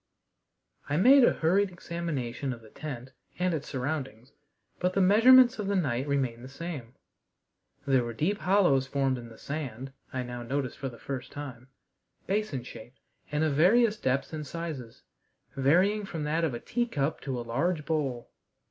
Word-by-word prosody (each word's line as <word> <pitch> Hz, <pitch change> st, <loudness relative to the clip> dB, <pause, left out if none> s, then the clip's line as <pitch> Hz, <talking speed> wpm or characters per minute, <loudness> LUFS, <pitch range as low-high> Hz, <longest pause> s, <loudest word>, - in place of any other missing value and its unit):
I 145 Hz, -, +1 dB
made 260 Hz, -, +7 dB
a -, -, +6 dB
hurried 190 Hz, +5 st, +2 dB
examination 150 Hz, -8 st, -4 dB
of 115 Hz, -, -11 dB
the 110 Hz, -, -16 dB
tent 130 Hz, -4 st, -7 dB, 0.3 s
and 180 Hz, 0 st, +1 dB
its 150 Hz, -2 st, -3 dB
surroundings, 130 Hz, -3 st, -4 dB, 0.5 s
but 180 Hz, 0 st, 0 dB
the 195 Hz, -, +1 dB
measurements 240 Hz, +6 st, +7 dB
of 205 Hz, -, -2 dB
the 200 Hz, -, +1 dB
night 135 Hz, -7 st, 0 dB
remained 130 Hz, -4 st, -1 dB
the 130 Hz, -, -9 dB
same. 140 Hz, -5 st, -7 dB, 0.9 s
There 135 Hz, -3 st, +3 dB
were 120 Hz, -, -4 dB
deep 175 Hz, -, -1 dB
hollows 180 Hz, -9 st, +3 dB
formed 135 Hz, -2 st, 0 dB
in 120 Hz, -1 st, -10 dB
the 115 Hz, -, -14 dB
sand, 135 Hz, -3 st, -5 dB, 0.2 s
I 130 Hz, -1 st, -2 dB
now 120 Hz, 0 st, -6 dB
noticed 130 Hz, +1 st, -3 dB
for 135 Hz, -, -3 dB
the 120 Hz, -, -12 dB
first 130 Hz, 0 st, -6 dB
time, 130 Hz, -4 st, -8 dB, 0.6 s
basin 195 Hz, -, -1 dB
shaped 120 Hz, +1 st, -12 dB, 0.3 s
and 150 Hz, +1 st, +1 dB
of 155 Hz, -2 st, +1 dB
various 210 Hz, +9 st, +4 dB
depths 135 Hz, -6 st, -1 dB
and 150 Hz, -2 st, -5 dB
sizes, 150 Hz, -8 st, -6 dB, 0.5 s
varying 185 Hz, +10 st, +3 dB
from 165 Hz, -5 st, -5 dB
that 155 Hz, +3 st, 0 dB
of 150 Hz, -7 st, 0 dB
a -, -, -5 dB
teacup 160 Hz, -, -1 dB
to 130 Hz, -3 st, -3 dB
a -, -, -4 dB
large 150 Hz, +7 st, -1 dB
bowl. 140 Hz, -7 st, -2 dB
145 Hz, 170 wpm, -29 LUFS, 130-175 Hz, 0.9 s, made